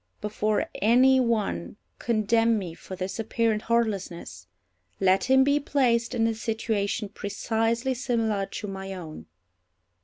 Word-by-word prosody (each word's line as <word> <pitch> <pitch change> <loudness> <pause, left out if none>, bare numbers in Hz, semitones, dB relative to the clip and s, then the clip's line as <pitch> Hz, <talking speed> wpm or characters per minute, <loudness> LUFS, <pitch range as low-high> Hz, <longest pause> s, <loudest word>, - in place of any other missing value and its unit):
Before 210 0 -1
any 255 +5 +5
one 225 -6 -1 0.2
condemn 225 0 +2
me 180 -5 -5
for 185 - -9
this 190 +3 -5
apparent 225 -1 0
heartlessness, 195 - -2 0.5
let 190 0 +3
him 265 0 +5
be 285 +2 +3
placed 245 -4 +1
in 225 -1 +2
a 225 - +1
situation 220 -1 -2
precisely 225 +5 -1
similar 225 -5 -1
to 210 - -6
my 195 0 -6
own. 160 -4 -9
220 Hz, 125 wpm, -26 LUFS, 195-235 Hz, 0.5 s, any